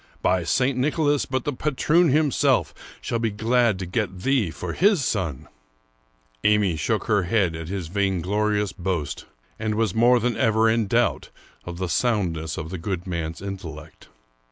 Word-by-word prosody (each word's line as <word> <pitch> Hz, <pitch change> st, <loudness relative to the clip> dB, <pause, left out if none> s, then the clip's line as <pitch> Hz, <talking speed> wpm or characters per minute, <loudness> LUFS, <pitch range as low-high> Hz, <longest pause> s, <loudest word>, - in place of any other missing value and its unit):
^ -, -, -35 dB
By 90 Hz, -1 st, +2 dB
St. 130 Hz, +8 st, +1 dB
Nicholas, 145 Hz, +2 st, +1 dB
but 130 Hz, -1 st, -2 dB
the 145 Hz, -, -2 dB
patroon 155 Hz, +5 st, +2 dB
himself 150 Hz, -1 st, +2 dB, 0.3 s
shall 115 Hz, -, -2 dB
be 115 Hz, -1 st, 0 dB
glad 115 Hz, 0 st, +1 dB
to 95 Hz, -, -5 dB
get 95 Hz, -1 st, -3 dB
thee 130 Hz, -7 st, +1 dB
for -, -, -5 dB
his 195 Hz, -, +3 dB
son! 85 Hz, -, -2 dB, 0.5 s
" -, -, -40 dB, 0.2 s
Amy 105 Hz, -5 st, +3 dB
shook 105 Hz, +8 st, -1 dB
her 105 Hz, -5 st, +1 dB
head 90 Hz, -3 st, +1 dB
at 80 Hz, -1 st, -6 dB
his 95 Hz, -2 st, -4 dB
vainglorious 100 Hz, +2 st, 0 dB
boast, 90 Hz, -5 st, -3 dB, 0.3 s
and 110 Hz, -1 st, -1 dB
was 110 Hz, -4 st, 0 dB
more 120 Hz, +2 st, +4 dB
than 120 Hz, 0 st, 0 dB
ever 110 Hz, +1 st, +3 dB
in 110 Hz, -1 st, +2 dB
doubt 120 Hz, +3 st, +1 dB, 0.4 s
of 85 Hz, -1 st, -6 dB
the 95 Hz, 0 st, -2 dB
soundness 85 Hz, -6 st, -1 dB
of 80 Hz, +2 st, -5 dB
the 95 Hz, -, -5 dB
good 90 Hz, 0 st, -4 dB
man's 85 Hz, -1 st, -4 dB
intellect. 90 Hz, -6 st, -8 dB
105 Hz, 170 wpm, -24 LUFS, 90-120 Hz, 0.5 s, more